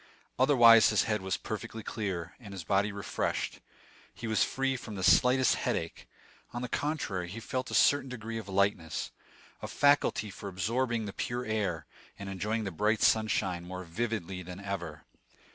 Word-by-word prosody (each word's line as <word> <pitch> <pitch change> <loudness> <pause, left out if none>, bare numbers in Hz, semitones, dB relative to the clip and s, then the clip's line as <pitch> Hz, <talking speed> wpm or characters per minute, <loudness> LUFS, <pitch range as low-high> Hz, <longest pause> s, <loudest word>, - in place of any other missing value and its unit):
Otherwise, 120 -5 +7
his 105 - +3
head 105 -3 -1
was 95 -1 -1
perfectly 110 +1 -6
clear, 95 -7 -4
and 100 -5 -10
his 90 - -6
body 100 +4 +1
refreshed; 100 -1 -3 0.5
he 115 - -9
was 110 -1 +2
free 135 0 0
from 115 -4 -7
the 95 - -4
slightest 125 +8 +5
headache; - - -3 0.4
on 120 +1 -4
the - - -2
contrary, 115 - -2
he 105 +6 -6
felt 130 +3 -3
a - - -3
certain 140 -2 +4
degree 115 -2 -5
of 105 -3 -9
lightness, 95 -4 0 0.5
a - - -4
faculty 145 -7 +2
for 100 0 -7
absorbing 115 +5 -1
the 100 - -6
pure 120 +1 -3
air, 105 -7 -1 0.3
and 100 0 -7
enjoying 105 +4 -2
the 100 - -3
bright 105 +5 +1
sunshine 100 -5 +2
more 90 +1 -6
vividly 95 -1 -3
than 90 +1 -8
ever. 85 -7 -5
105 Hz, 165 wpm, -30 LUFS, 95-115 Hz, 0.5 s, Otherwise